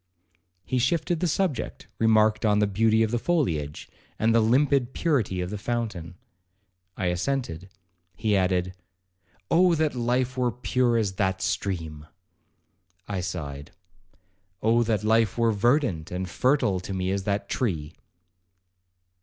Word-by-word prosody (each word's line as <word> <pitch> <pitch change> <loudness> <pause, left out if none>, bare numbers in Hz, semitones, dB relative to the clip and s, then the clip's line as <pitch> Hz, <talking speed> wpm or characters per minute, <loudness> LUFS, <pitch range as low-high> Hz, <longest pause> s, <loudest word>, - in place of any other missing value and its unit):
He 130 0 0
shifted 160 +6 0
the 180 - 0
subject, 165 - -2
remarked 110 -1 +3
on 105 -2 +3
the 105 - +3
beauty 110 +2 +2
of 110 - -1
the 120 - 0
foliage, 85 - -1 0.3
and 110 +1 +2
the 115 - +5
limpid 130 +2 +2
purity 120 - 0
of 90 +1 -4
the 105 - -4
fountain. 105 -7 -3 0.8
I 95 - -2
assented. 90 -1 -2 0.5
He 110 +1 0
added, 90 -1 +1 0.8
'Oh 175 +1 +5
that 155 -1 +1
life 125 +1 0
were 125 -1 +2
pure 125 0 +1
as 105 -4 0
that 95 -1 0
stream!' 80 -7 -3 1.0
I 100 -2 -3
sighed, 75 -5 -6 0.9
'Oh 115 +2 +4
that 110 -3 0
life 110 -1 +2
were 115 -1 +3
verdant 110 - +1
and 90 +1 -4
fertile 125 -2 +1
to 95 +2 -6
me 95 0 -1
as 100 -1 -2
that 100 0 -1
tree!' 80 - -2
110 Hz, 135 wpm, -26 LUFS, 95-125 Hz, 1.0 s, the